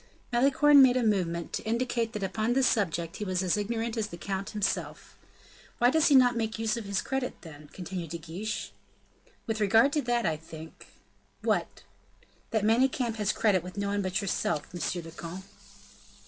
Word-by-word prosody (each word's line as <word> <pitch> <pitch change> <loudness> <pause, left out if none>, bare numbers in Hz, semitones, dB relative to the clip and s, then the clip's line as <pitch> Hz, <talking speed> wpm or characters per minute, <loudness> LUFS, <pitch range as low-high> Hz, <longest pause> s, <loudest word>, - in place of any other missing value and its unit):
Malicorne 280 +3 +6
made 255 -1 +6
a 250 - +1
movement, 175 -6 0
to - - -2
indicate 235 0 -1
that 210 - -4
upon 215 +5 0
this 265 0 +3
subject 170 -8 0
he - - -4
was 185 -2 -1
as 180 - +2
ignorant 225 +2 -2
as 220 -3 -1
the 170 - -9
count 195 +1 -4
himself. 210 -2 -3 0.6
"Why 245 +1 +4
does 320 +1 +3
he 285 - +5
not 250 -2 +6
make 225 -1 -2
use 225 0 0
of 230 -3 -5
his 200 -1 -1
credit, 265 -1 -3
then?" 150 -3 -12
continued 180 -2 -6
De 170 - -4
Guiche. 180 +7 -5 0.7
"With 220 -1 -2
regard 225 +7 +4
to 300 - +2
that, 240 -2 0
I 155 - 0
think 160 0 -12 0.2
" - - -39
"What?" - - -1 0.7
"That 220 -3 0
Manicamp 240 0 +2
has 210 -2 +1
credit 200 -5 +2
with 180 +3 -10
no 200 0 -1
one 205 0 0
but 185 0 -1
yourself, 180 -5 -2
monsieur 175 0 -3
le 165 - -10
comte!" 170 +3 -8
210 Hz, 190 wpm, -28 LUFS, 180-235 Hz, 0.7 s, Malicorne